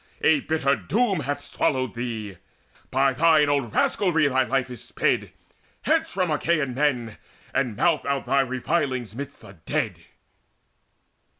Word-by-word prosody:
A 155 Hz, -1 st, +5 dB
bitter 140 Hz, -2 st, +1 dB
doom 215 Hz, -4 st, 0 dB
Hath 145 Hz, 0 st, -3 dB
swallowed 130 Hz, -4 st, -1 dB
thee: 110 Hz, -5 st, -5 dB, 0.5 s
by 135 Hz, +1 st, +2 dB
thine 155 Hz, 0 st, +4 dB
own 140 Hz, -5 st, +1 dB
rascalry 165 Hz, -, +2 dB
Thy 130 Hz, -1 st, +2 dB
life 135 Hz, -1 st, 0 dB
is 125 Hz, -, -6 dB
sped. -, -, 0 dB, 0.5 s
Hence -, -, +1 dB
from 185 Hz, -3 st, 0 dB
Achaean 150 Hz, -3 st, 0 dB
men, 125 Hz, -5 st, 0 dB, 0.4 s
And 125 Hz, -5 st, 0 dB
mouth 165 Hz, +6 st, +2 dB
out 140 Hz, -1 st, -1 dB
thy 140 Hz, -, +3 dB
revilings 130 Hz, -, -1 dB
midst 140 Hz, +4 st, -7 dB
the 100 Hz, -, -13 dB
dead!" -, -, -1 dB
140 Hz, 135 wpm, -24 LUFS, 125-155 Hz, 0.5 s, A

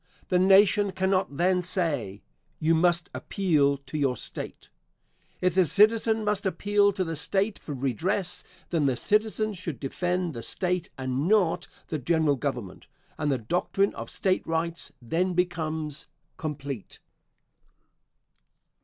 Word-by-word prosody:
The 180 Hz, -2 st, +3 dB
Nation 195 Hz, +1 st, +5 dB
cannot 190 Hz, -6 st, 0 dB
then 180 Hz, +1 st, +2 dB
say, 150 Hz, -, -1 dB, 0.3 s
"You 160 Hz, +1 st, +2 dB
must 175 Hz, +1 st, +2 dB
appeal 150 Hz, -8 st, +1 dB
to 140 Hz, +2 st, -6 dB
your 135 Hz, -3 st, +1 dB
State." -, -, -5 dB, 0.7 s
If 185 Hz, -1 st, +2 dB
the 185 Hz, +1 st, +5 dB
citizen 220 Hz, +4 st, +4 dB
must 210 Hz, -1 st, +1 dB
appeal 205 Hz, +1 st, +2 dB
to 190 Hz, -1 st, -1 dB
the 165 Hz, -2 st, -4 dB
State 195 Hz, +6 st, 0 dB
for 145 Hz, -, -6 dB
redress, 165 Hz, -, -1 dB, 0.3 s
then 160 Hz, -5 st, +2 dB
the 130 Hz, -, +1 dB
citizen 215 Hz, -, +1 dB
should 175 Hz, -6 st, -6 dB
defend 175 Hz, +4 st, -2 dB
the 115 Hz, -, -6 dB
State 180 Hz, -, -2 dB
and 130 Hz, +3 st, -2 dB
not 200 Hz, -5 st, +2 dB, 0.2 s
the 155 Hz, -, -2 dB
General 160 Hz, +1 st, +2 dB
Government, 125 Hz, -8 st, -5 dB, 0.3 s
and 150 Hz, -1 st, 0 dB
the 135 Hz, -, +1 dB
doctrine 180 Hz, -, 0 dB
of -, -, -7 dB
State 185 Hz, -1 st, 0 dB
Rights 165 Hz, +1 st, -2 dB
then 175 Hz, +9 st, 0 dB
becomes 160 Hz, -4 st, -2 dB, 0.3 s
complete. 140 Hz, -, -6 dB
170 Hz, 135 wpm, -27 LUFS, 145-190 Hz, 0.7 s, Nation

